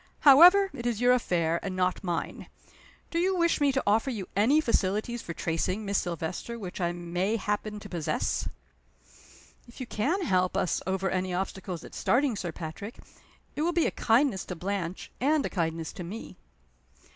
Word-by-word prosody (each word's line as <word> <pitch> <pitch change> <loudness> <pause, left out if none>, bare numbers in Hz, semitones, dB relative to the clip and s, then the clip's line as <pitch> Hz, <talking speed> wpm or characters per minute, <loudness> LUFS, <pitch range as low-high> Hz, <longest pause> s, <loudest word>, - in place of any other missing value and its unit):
However, 360 +8 +8
it 240 -3 -4
is 235 -3 -1
your 245 +1 +5
affair, 170 -8 +1
and 190 -2 -4
not 185 +1 0
mine. 175 -3 -3 0.6
Do 335 - 0
you 375 +2 +2
wish 340 -3 +2
me 285 -1 +4
to 265 0 0
offer 220 +6 +2
you 210 -7 -4
any 235 +10 +4
facilities 230 -2 0
for 170 - -7
tracing 185 +6 -1
Miss 200 0 +1
Silvester 175 +7 -4
which 190 -3 -6
I 170 -1 +1
may 175 +4 -2
happen 210 0 -2
to 205 - -8
possess?" 170 -5 -2 1.2
"If 240 - -14
you 255 - -4
can 295 - -1
help 185 - +1
us - - 0
over 190 0 0
any 185 -1 -1
obstacles 185 -1 -4
at - - -12
starting, 260 -1 +1
Sir 180 -4 -4
Patrick, 170 +8 -7 0.6
it - - -2
will 345 +2 +1
be 340 -1 +2
a - - +1
kindness 230 -3 +2
to 180 - -5
Blanche, 185 0 -4
and 295 +2 +2
a - - -3
kindness 165 -3 -2
to 190 - -7
me." 200 +7 -8
205 Hz, 180 wpm, -28 LUFS, 180-250 Hz, 1.2 s, However